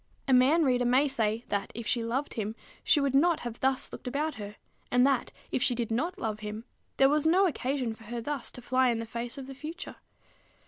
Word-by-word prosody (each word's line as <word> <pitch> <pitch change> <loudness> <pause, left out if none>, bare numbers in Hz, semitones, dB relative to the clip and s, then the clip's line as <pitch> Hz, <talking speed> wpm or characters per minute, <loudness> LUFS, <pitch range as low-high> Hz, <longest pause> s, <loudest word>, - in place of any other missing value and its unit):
A 265 - +3
man 270 +7 +5
reader 250 -2 +2
may 255 +4 +4
say, 225 -3 0
that, 200 -1 -1
if 235 - -5
she 235 +1 +1
loved 255 +5 -2
him, 220 0 -3 0.3
she 300 - +4
would 280 -2 +1
not 330 +4 +4
have 240 -1 -6
thus 265 0 +1
looked - - -8
about 300 +5 -1
her; 205 0 -7 0.3
and 245 +1 +4
that, 270 -3 +1 0.2
if - - 0
she 245 - +3
did 235 -2 -2
not 325 +11 -1
love 215 -1 -3
him, 215 +1 -6 0.3
there 270 - +6
was 300 +2 +2
no 370 +4 +5
occasion 260 -7 -1
for 225 0 -15
her 235 +2 -4
thus 280 +1 -3
to 245 - -9
fly 255 +1 +3
in 235 - +1
the 230 - -4
face 235 +2 -5
of 270 - -6
the 270 - -8
future. 310 +6 -7
250 Hz, 230 wpm, -29 LUFS, 230-280 Hz, 0.3 s, there